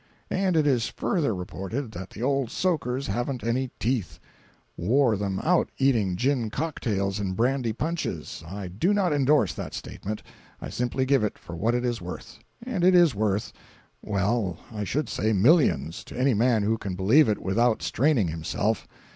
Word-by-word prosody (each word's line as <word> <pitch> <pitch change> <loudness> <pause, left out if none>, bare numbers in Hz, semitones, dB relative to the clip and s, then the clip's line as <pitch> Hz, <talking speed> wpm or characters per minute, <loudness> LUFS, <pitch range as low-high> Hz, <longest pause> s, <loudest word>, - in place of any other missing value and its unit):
And 185 -3 +1
it 155 - +3
is 125 -6 +2
further 150 - -1
reported 95 +7 -5
that 95 -3 -7
the 110 - -7
old 135 -2 +1
soakers 140 -7 -1
haven't 120 +1 -2
any 125 +3 0
teeth—wore 115 +1 -1
them 100 -1 -2
out 180 +2 +3
eating 115 -9 +2
gin 125 +1 0
cocktails 105 -9 -2
and 95 -2 -2
brandy 125 +1 +1
punches. 130 - -4
I 95 +2 -6
do 165 - +1
not 185 -6 +2
endorse 140 - +3
that - - -6
statement—I 105 +2 -8
simply 125 +2 -1
give 135 -3 +3
it 105 - -2
for 85 - -9
what 115 +7 +1
it 125 0 0
is 120 -4 -1
worth—and 190 - -7
it 185 0 +6
is 175 -5 +6
worth—well, 100 -1 -2
I 105 -2 -4
should 140 +7 -1
say, 110 +1 0
millions, 115 - +3
to - - -9
any 130 +1 +3
man 115 0 +3
who 110 +2 +1
can 95 -2 -4
believe 110 +9 +5
it 105 - +1
without 110 +4 +1
straining 130 - +2
himself. 85 +7 -2
115 Hz, 160 wpm, -26 LUFS, 100-140 Hz, -, it